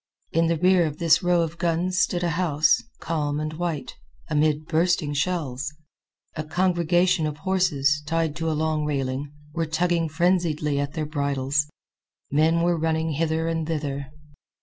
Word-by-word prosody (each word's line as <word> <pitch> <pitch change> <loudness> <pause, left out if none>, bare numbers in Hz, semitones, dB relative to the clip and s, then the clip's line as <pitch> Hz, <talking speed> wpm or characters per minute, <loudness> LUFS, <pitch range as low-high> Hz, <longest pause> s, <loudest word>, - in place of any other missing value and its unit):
In 165 0 +2
the 165 0 +1
rear 180 0 +4
of 150 - -6
this 165 -2 +4
row 175 -1 +3
of 165 +1 -5
guns 175 +1 0
stood 175 -1 +1
a 170 - +1
house, 155 -3 +2 0.2
calm 150 -3 -1
and 155 0 -3
white, 165 -3 -4 0.3
amid 150 0 +2
bursting 165 -2 +1
shells. 145 -3 -2 0.6
A 155 - -3
congregation 175 0 +2
of 150 -1 -5
horses, 155 -5 +1
tied 165 -1 0
to 165 -1 -1
a - - 0
long 155 -1 0
railing, 140 -1 -2 0.2
were 165 -1 -1
tugging 170 0 +1
frenziedly 155 -3 +1
at 140 0 -2
their 155 -2 -2
bridles. 140 -1 0 0.6
Men 160 +3 +3
were 175 -1 +2
running 160 0 0
hither 160 +2 0
and 165 -1 -1
thither. 140 -3 -3
160 Hz, 155 wpm, -24 LUFS, 150-170 Hz, 0.6 s, rear